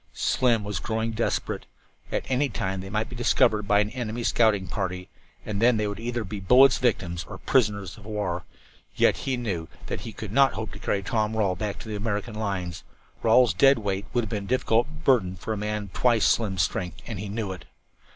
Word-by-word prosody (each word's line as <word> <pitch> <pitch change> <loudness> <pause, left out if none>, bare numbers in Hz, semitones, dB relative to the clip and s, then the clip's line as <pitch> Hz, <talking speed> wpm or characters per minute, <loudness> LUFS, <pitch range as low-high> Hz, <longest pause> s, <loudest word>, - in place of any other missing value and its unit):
Slim 120 -4 +2
was 100 -3 -3
growing 110 +5 -2
desperate. 115 +1 -2 0.4
At - - -1
any 135 +2 +1
time 95 -4 -3
they 95 - -8
might 105 +2 -1
be 125 - -9
discovered 110 -3 +2
by 105 0 +4
an 105 +1 -2
enemy 120 -2 -4
scouting 110 -5 +3
party, 90 -1 -4 0.4
and 105 -1 -3
then 120 -1 +5
they 105 - 0
would 100 0 -5
either 120 0 -2
be 105 +1 -6
bullets' 125 +8 +6
victims 90 -8 0
or - - -8
prisoners 105 -6 0
of 100 - -15
war. 100 -5 -2 0.5
Yet - - +4
he 130 -2 -2
knew 95 -9 -3 0.2
that - - -4
he 115 - -6
could 110 -2 -7
not 135 +3 +4
hope 110 -1 -5
to - - -10
carry 100 -1 -1
Tom 110 +4 0
Rawle 100 -4 +1
back 100 +3 -3
to - - -10
the 110 - -4
American 105 +1 -2
lines. 95 -6 -3 0.4
Rawle's 115 -1 +5
dead 135 +9 +5
weight 100 -1 -2
would 120 - +1
have 110 - -5
been 100 -2 -3
a - - -10
difficult 120 0 +2 0.2
burden 110 -11 +3
for 110 +5 -4
a - - -3
man 105 +1 -2
of 95 -3 -12
twice 120 -3 +3
Slim's 95 -7 +2
strength, 90 +2 -3
and 110 -5 -5
he 105 0 -5
knew 105 -1 -3
it. 95 - -8
105 Hz, 215 wpm, -26 LUFS, 95-115 Hz, 0.5 s, bullets